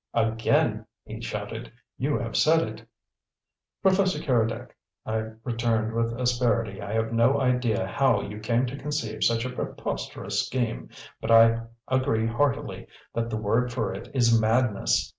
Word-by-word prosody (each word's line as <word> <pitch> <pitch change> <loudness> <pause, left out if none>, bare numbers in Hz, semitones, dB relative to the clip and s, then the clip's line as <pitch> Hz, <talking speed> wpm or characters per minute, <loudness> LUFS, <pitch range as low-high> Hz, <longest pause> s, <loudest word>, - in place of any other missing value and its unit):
"Again," 115 -1 +1 0.2
he - - -8
shouted, - - -5 0.2
"you 145 +3 0
have 115 -2 -4
said 160 -4 +4
it!" 110 +1 -10 1.0
"Professor 190 -3 +3
Keredec," 120 -7 0 0.4
I 110 0 -2
returned, 115 -2 0
with 115 +1 -1
asperity, 120 -5 +1
"I 100 +1 -5
have 110 +1 0
no 120 +5 +4
idea 125 -6 +1
how 130 +7 +2
you 105 +1 -7
came 115 +3 +1
to 130 +2 -5
conceive 120 -7 -3
such 115 +1 +2
a 125 - -3
preposterous - - -3
scheme, - - -2 0.3
but 110 - -4
I 115 0 +6 0.2
agree 130 -4 +1
heartily 120 +3 -1 0.3
that 115 0 -1
the 110 - -2
word 115 +4 +1
for 115 -5 -2
it 95 - -8
is 115 -3 +4
madness. 110 -1 +2
115 Hz, 145 wpm, -26 LUFS, 110-125 Hz, 1.0 s, I